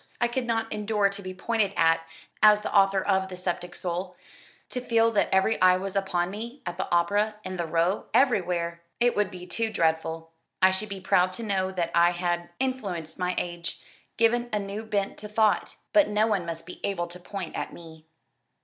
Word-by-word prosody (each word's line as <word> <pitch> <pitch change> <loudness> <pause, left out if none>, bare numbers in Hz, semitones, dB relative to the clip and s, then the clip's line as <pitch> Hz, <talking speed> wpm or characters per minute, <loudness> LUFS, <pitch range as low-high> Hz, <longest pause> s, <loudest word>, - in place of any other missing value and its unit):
I 240 - +3
could 240 +1 -2
not 225 -1 -1
endure 210 -1 +1
to 200 0 -7
be 185 -1 -6
pointed 210 0 0
at 165 0 +4 0.4
as 210 -1 +7
the - - -4
author 195 -1 +4
of 190 -1 +1
'The 180 - -7
Sceptic 175 -1 -3
Soul.' 180 +1 -4 0.5
To 250 - -3
feel 230 -2 +3
that 210 - +2
every 190 +4 +2
eye 185 0 +6
was 195 +1 -5
upon 185 -2 0
me 235 +6 -7
at 175 -1 -4
the 190 - -3
opera 205 +5 +2
in 185 0 -5
the 170 -1 -2
Row 170 +4 +1
everywhere! 175 -9 +1 0.2
It 240 0 +3
would 205 -2 +1
be 180 -2 -9
too 220 +5 -2
dreadful. 160 -2 0 0.3
I 185 0 +6
should 200 +3 -3
be 195 -1 -6
proud 185 0 +3
to 230 - -5
know 190 -3 0
that 170 -2 -1
I 170 +1 +5
had 175 -1 -2
influenced 200 -12 -3
my 180 0 0
age 175 -1 -3 0.4
given 240 +1 +2
a 210 - +1
new 200 +1 -4
bent 200 -2 -1
to 210 - -7
thought 215 0 +1 0.2
but 310 -2 +6
no 210 +1 +2
one 200 -6 0
must 165 0 -5
be 180 - -10
able 185 -4 -1
to 175 +1 -10
point 180 -1 -6
at - - -3
me." 160 -2 -13
190 Hz, 205 wpm, -27 LUFS, 175-215 Hz, 0.5 s, as